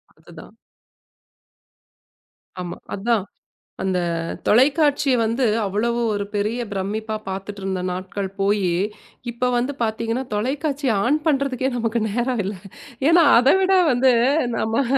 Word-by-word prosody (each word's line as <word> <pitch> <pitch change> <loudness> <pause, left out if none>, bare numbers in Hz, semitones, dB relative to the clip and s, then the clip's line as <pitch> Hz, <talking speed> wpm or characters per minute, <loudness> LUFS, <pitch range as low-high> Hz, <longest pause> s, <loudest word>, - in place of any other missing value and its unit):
அது - - -18
தான். - - -14 2.0
ஆமா. 175 -1 -6 0.2
அதான். 215 +1 0 0.6
அந்த 190 -1 0 0.5
தொலைக்காட்சி 285 +3 +3
வந்து 230 +4 0 0.2
அவ்வளவு 225 +4 -1
ஒரு 205 0 -2
பெரிய 210 +3 -1
பிரம்மிப்பா 215 +3 -3
பாத்துட்டு 195 +1 -6
இருந்த 190 -1 -2
நாட்கள் 190 +2 -4
போயி 200 -2 +2 0.6
இப்ப 250 +1 -1
வந்து 250 +4 0
பாத்தீங்கன்னா 230 +3 -1
தொலைக்காட்சி 275 +5 -1 0.2
ஆன் 285 +5 +2
பண்றதுக்கே 270 -3 +1
நமக்கு 230 0 -1
நேரம் 240 +2 -1
இல்ல. 200 +2 -3 0.5
ஏன்னா 335 0 +6
அதைவிட 375 +10 +4 0.2
வந்து 255 +1 +4 0.4
நம்ப 225 +5 0
230 Hz, 110 wpm, -22 LUFS, 205-265 Hz, 2.0 s, ஏன்னா